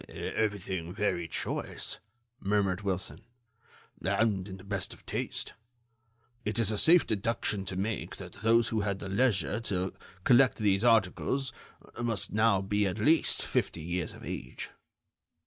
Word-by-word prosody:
"Everything 95 -5 -2
very 90 -4 0
choice," - - -2 0.4
murmured 100 -1 +1
Wilson, 95 -2 -3 0.8
"and 100 0 +1
in 95 -1 -7
the 95 - -13
best 100 -1 -2
of - - -22
taste. - - -3 0.9
It 105 +1 -1
is 115 -2 +2
a 105 - -1
safe 170 +1 +6
deduction 105 -1 -1
to 95 - -4
make 100 +3 -2
that - - -10
those 115 +1 +4
who 110 -1 0
had 100 -1 -1
the 95 - -6
leisure 100 - +2
to 95 -4 -1 0.3
collect 125 +3 +5
these 100 -1 +2
articles 120 +4 +2 0.5
must 110 -5 +1
now 105 -2 +4
be 105 +1 +1
at 95 +2 -2
least 150 +9 +3
fifty 85 - -1
years 85 0 -2
of - - -11
age." 60 - -5
100 Hz, 145 wpm, -30 LUFS, 95-110 Hz, 0.9 s, safe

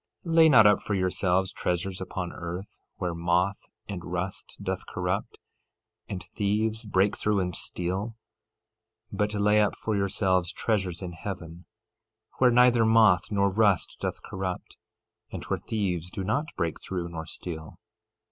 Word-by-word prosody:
13:19 165 - -2
Lay 160 -1 +8
not 115 -7 +8
up 105 -1 +5
for 105 - -2
yourselves 95 0 +1
treasures 90 +2 -2
upon 95 -1 -4
earth, 90 +3 -7 0.2
where 90 -2 -2
moth 90 +3 0 0.2
and 95 -4 -5
rust 90 +2 -5
doth - - -4
corrupt, - - -2 0.7
and 95 -2 -4
thieves 110 +2 -1
break 100 0 +2
through 105 -1 +1
and 90 -2 -2
steal; 95 +6 -3 1.0
13:20 - - -5
But 105 0 +1
lay 105 +1 +4
up 105 - +1
for 110 - -2
yourselves 95 -2 +1
treasures 95 -4 -1
in 90 - -4
heaven, 85 -1 -7 0.7
where 130 - +6
neither 120 -1 +5
moth 110 -3 +5
nor 100 -1 +2
rust 100 -2 +2
doth - - -3
corrupt, 95 -1 -5 0.6
and - - -6
where - - -2
thieves 90 -6 -2
do 95 - -5
not 140 +11 0
break 85 -2 -2
through 90 -2 -3
nor 80 -2 -6
steal. 80 -3 -7
95 Hz, 150 wpm, -27 LUFS, 90-105 Hz, 1.0 s, Lay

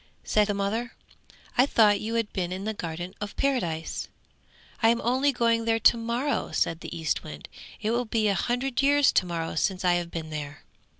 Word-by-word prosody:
said 210 -1 +2
the 205 - 0
mother. 220 +4 -2 0.7
'I 255 - +6
thought 210 -6 +4
you 225 +2 -3
had 230 -2 -1
been 180 -2 -2
in 185 +1 -4
the 220 +1 -2
Garden 175 -1 -5
of 205 -1 -5
Paradise.' 175 -13 -1 0.7
'I 225 - +5
am 235 0 +2
only 260 +4 +2
going 230 -2 +1
there 225 0 +2
to 225 - +5
morrow!' 235 +5 -2
said 165 - 0
the 170 - -7
Eastwind. 110 - -3 0.3
'It 215 - -1
will 240 +1 0
be 220 -1 +1
a 200 - +3
hundred 245 +5 -1
years 285 0 +4
to 180 - +2
morrow 165 -1 -3
since 185 +3 -1
I 180 - +4
have 170 - -8
been 160 -2 -6
there. 145 -1 -6
215 Hz, 195 wpm, -27 LUFS, 175-235 Hz, 0.7 s, I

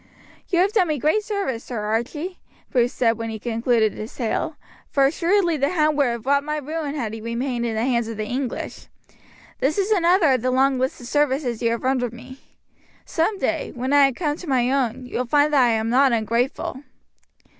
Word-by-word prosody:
"You 360 - 0
have 395 +3 +2
done 380 -5 +3
me 305 -1 0
great 310 - +1
service, 395 - -3
Sir 240 -3 -5
Archie," 240 - -3 0.3
Bruce 245 -1 +2
said 230 -2 +1
when 225 0 -3
he 220 - -4
concluded 230 -1 +1
his 215 +2 -8
tale, 275 +6 -2 0.3
"for 275 -1 +3
assuredly 340 +3 +2
the 280 +1 +1
hound 310 -4 +2
would 285 -2 +3
have 235 -1 -3
wrought 280 +1 +3
my 300 +1 -2
ruin 300 0 -4
had 230 -7 -3
he 225 - -6
remained 235 +1 -2
in 225 - -2
the 220 - 0
hands 235 -3 +1
of 225 -2 -6
the 215 - -2
English. 250 +2 -4 0.7
This 285 +7 +1
is 400 +2 0
another 350 -5 +4
of 255 -3 +2
the 255 - 0
long 265 +1 +2
list 260 +1 -1
of - - -9
services 265 -4 0
you 230 - +2
have 230 0 -2
rendered 255 -3 0
me. 255 +2 -11 0.7
Some 375 +5 0
day, 325 -4 -2
when 255 +3 -2
I 280 -1 +6
come 295 +2 -2
to 345 - -8
my 255 -1 +2
own, 255 -2 -1
you 250 - -4
will 250 - -1
find 295 +3 +3
that 275 -3 +5
I 240 - +4
am 220 +1 0
not 265 0 +4
ungrateful." 235 +4 -1
260 Hz, 210 wpm, -22 LUFS, 235-300 Hz, 0.7 s, I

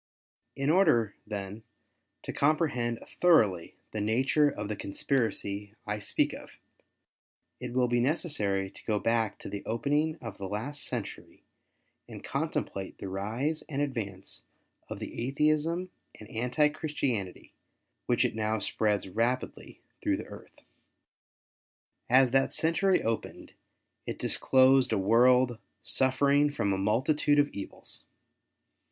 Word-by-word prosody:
In 140 +2 +1
order, 120 - +4
then, 105 0 -5 0.6
to - - -5
comprehend 140 -6 +1
thoroughly 105 - +3 0.2
the 110 - -3
nature 130 +7 +3
of 105 -6 -5
the 105 - -3
conspiracy 105 -2 -2
I 105 0 -2
speak 105 - 0
of, - - -10 1.1
it - - -6
will 125 -1 +2
be 120 0 +1
necessary 110 - 0
to - - -15
go 110 -2 +1
back 115 0 0
to - - -7
the 100 - -5
opening 145 +7 0
of 115 -4 -8
the 95 -1 -5
last 125 +9 -3
century 120 -5 -6 0.7
and - - -9
contemplate 95 -1 -3
the 95 - -6
rise 115 +11 -2
and 140 -2 -3
advance 110 -10 -4 0.5
of - - -5
the 120 - -4
Atheism 155 +6 +1 0.3
and 110 - -11
Anti 125 +6 +2
Christianity 135 - -3 0.5
which - - +3
it - - 0
now 110 0 0
spreads 105 -2 0
rapidly 115 +6 -2 0.2
through - - +1
the - - -7
earth. - - -13 1.5
As 130 0 +5
that 135 +1 +2
century 180 +4 +2
opened 115 0 -4 0.5
it - - -3
disclosed 130 -1 +4
a 110 - +2
world 120 +4 +4 0.2
suffering 140 +4 +3
from 100 -8 0
a - - 0
multitude 135 +9 +2
of 145 0 +4
evils. 100 - -8
120 Hz, 130 wpm, -29 LUFS, 105-145 Hz, 1.5 s, As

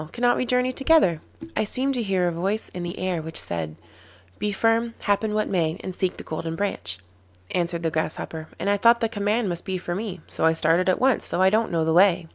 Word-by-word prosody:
Cannot 245 0 +2
we 250 - -1
journey 250 +1 +2
together?' 270 - +3 0.3
'I - - +2
seemed 265 +5 0
to 250 - -1
hear 190 -4 +1
a - - +1
voice 195 +6 -2
in 180 - -5
the 175 0 -5
air 185 -3 -1
which 160 +1 -3
said: 80 -2 -4 0.6
"Be 210 0 0
firm, 230 +3 +1
happen 210 +1 +1
what 215 - +1
may, 170 -2 0
and 185 - -4
seek 185 0 -1
the - - -7
Golden 165 +1 -4
Branch,"' 165 - -2 0.6
answered 170 -1 0
the 165 - 0
Grasshopper, 160 0 -3
'and - - -4
I 205 0 +3
thought 235 +3 +5
the 225 - +2
command 210 +1 0
must 175 -2 -3
be 190 -2 -2
for 175 -1 -4
me, 195 -1 -4
so - - -5
I 160 0 +5
started 165 +3 +2
at 185 - +2
once, 260 -1 +2
though 185 - +1
I 190 - +5
don't 220 +1 +1
know 165 -2 +1
the 160 - +2
way. 180 -1 +5
190 Hz, 235 wpm, -24 LUFS, 170-220 Hz, 0.6 s, thought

